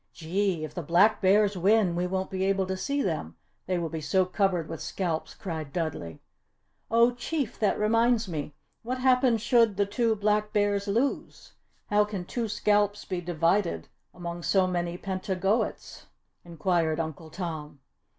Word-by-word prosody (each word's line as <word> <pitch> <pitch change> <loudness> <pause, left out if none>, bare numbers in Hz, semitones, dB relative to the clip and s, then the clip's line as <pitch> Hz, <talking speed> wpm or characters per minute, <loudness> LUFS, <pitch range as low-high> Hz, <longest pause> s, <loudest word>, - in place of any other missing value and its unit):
"Gee! 175 0 -1
If 155 - -6
the 175 - -4
Black 175 +7 +3
Bears 205 +1 +4
win 190 0 +3
we 175 +1 0
won't 190 +1 -3
be 190 0 -2
able 195 -1 +1
to 190 0 -3
see 280 +8 -1
them 85 - -3 0.3
they 185 -1 0
will 170 - -2
be 160 0 -5
so 185 +5 +2
covered 185 -3 0
with 165 - -7
scalps," 170 -4 -3
cried 160 -7 -5
Dudley. 145 - -4 0.7
"Oh 235 +2 +4
Chief! 265 0 -3
that 210 - +2
reminds 230 +1 +2
me! 150 -4 -5 0.3
What 250 +3 -3
happens 250 -3 +3
should 230 -6 +3
the 200 - +3
two 225 +2 +1
Black 210 0 0
Bears 205 -1 +1
lose? 235 +7 -2 0.4
How 210 0 +5
can 205 -4 -5
two 235 +4 -3
scalps 205 -1 +1
be 180 -2 -3
divided 170 - 0 0.2
among 175 -1 -6
so 190 +2 +3
many 175 -1 -2
Pentagoets?" 190 +3 -2 0.4
inquired 170 -2 0
Uncle 160 0 -5
Tom. 155 -5 -6
190 Hz, 160 wpm, -27 LUFS, 170-210 Hz, 0.7 s, How